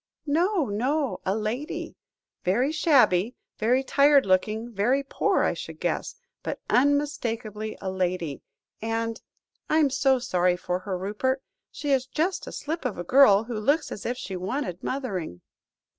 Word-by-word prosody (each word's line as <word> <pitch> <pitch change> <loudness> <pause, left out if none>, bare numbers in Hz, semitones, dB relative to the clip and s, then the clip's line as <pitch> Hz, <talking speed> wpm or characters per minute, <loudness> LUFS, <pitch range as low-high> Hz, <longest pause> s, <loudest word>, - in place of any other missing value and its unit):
"No, 335 +3 +2
no 260 +7 -1
a 190 - +2
lady. 225 +8 -3 0.5
Very 245 +10 +2
shabby, 250 - +3 0.2
very 250 +4 +2
tired 280 0 +5
looking, 215 +5 +1
very 245 +8 +2
poor, 275 - +1
I - - +2
should - - -8
guess; - - -2 0.3
but - - -4
unmistakably 240 -6 0
a 190 - -3
lady. 180 -5 -2 0.4
And 225 0 -2 0.5
I'm 305 -3 +3
so 270 0 +3
sorry 180 -7 +1
for 180 0 -2
her, 185 0 -4
Rupert; 215 +8 -1 0.3
she 290 - -4
is 260 -1 +2
just 325 +7 -1
a - - -6
slip 320 +3 -4
of 250 -6 -2
a 175 - -4
girl, 220 -1 +6
who 230 -2 -4
looks 290 +8 +1
as 200 - -6
if 245 +1 -2
she 190 - -5
wanted 185 - -3
mothering." 190 - -3
240 Hz, 150 wpm, -26 LUFS, 195-280 Hz, 0.5 s, girl